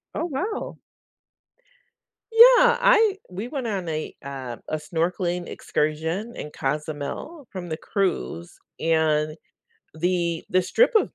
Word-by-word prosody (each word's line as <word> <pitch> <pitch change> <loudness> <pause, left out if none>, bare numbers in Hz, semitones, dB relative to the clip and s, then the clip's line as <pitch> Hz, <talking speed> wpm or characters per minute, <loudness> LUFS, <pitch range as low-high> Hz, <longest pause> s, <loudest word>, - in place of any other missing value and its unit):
Oh, - - -1
wow. 360 +7 -3 1.5
Yeah, 485 +1 +8
I 445 -5 +5
we 195 +6 -5
went 265 -3 -4
on 195 -5 -3
a, 155 -1 -3
uh, 130 -4 -6
a 155 - -1
snorkeling 175 +2 -2
excursion 160 +9 -2
in 150 - -7
Cozumel 150 - -4
from 180 -2 -6
the 155 - -3
cruise, 180 -2 -2 0.2
and 155 -1 +2 0.6
the 170 0 0
the 185 - +4
strip 485 - +3
of 440 - +2
175 Hz, 120 wpm, -24 LUFS, -, 1.5 s, Yeah